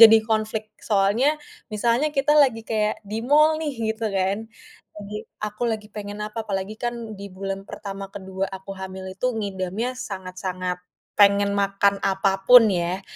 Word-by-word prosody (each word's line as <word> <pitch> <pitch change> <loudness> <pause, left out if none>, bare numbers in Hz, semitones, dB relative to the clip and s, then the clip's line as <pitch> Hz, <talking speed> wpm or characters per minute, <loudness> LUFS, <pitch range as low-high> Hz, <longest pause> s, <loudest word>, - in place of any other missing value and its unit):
jadi 225 -1 +11
konflik. 220 -1 -1 0.2
Soalnya 205 +4 +3 0.5
misalnya 235 +8 +1
kita 275 +2 +3
lagi 225 -5 +1
kayak 215 -1 -1
di 210 +1 -6
mall 305 +3 +5
nih 310 -2 -2 0.2
gitu 220 0 -2
kan, 195 +2 -1 0.5
lagi 210 0 -7 0.3
aku 210 +2 -5
lagi 215 -1 -3
pengen 205 0 -7
apa, 210 +2 -5
apalagi 195 +1 -3
kan 240 0 -2 0.2
di 200 - -7
bulan 195 0 -3
pertama, 195 -1 -6
ke-2 190 0 -3
aku 190 +1 -9
hamil 190 0 -6
itu 190 +6 -2
ngidamnya 200 +2 -2 0.2
sangat-sangat 185 -2 -4 0.4
pengen 200 0 +5
makan 200 0 +2
apapun 195 +5 +6
ya. 180 +1 -1
205 Hz, 145 wpm, -24 LUFS, 195-220 Hz, 0.5 s, jadi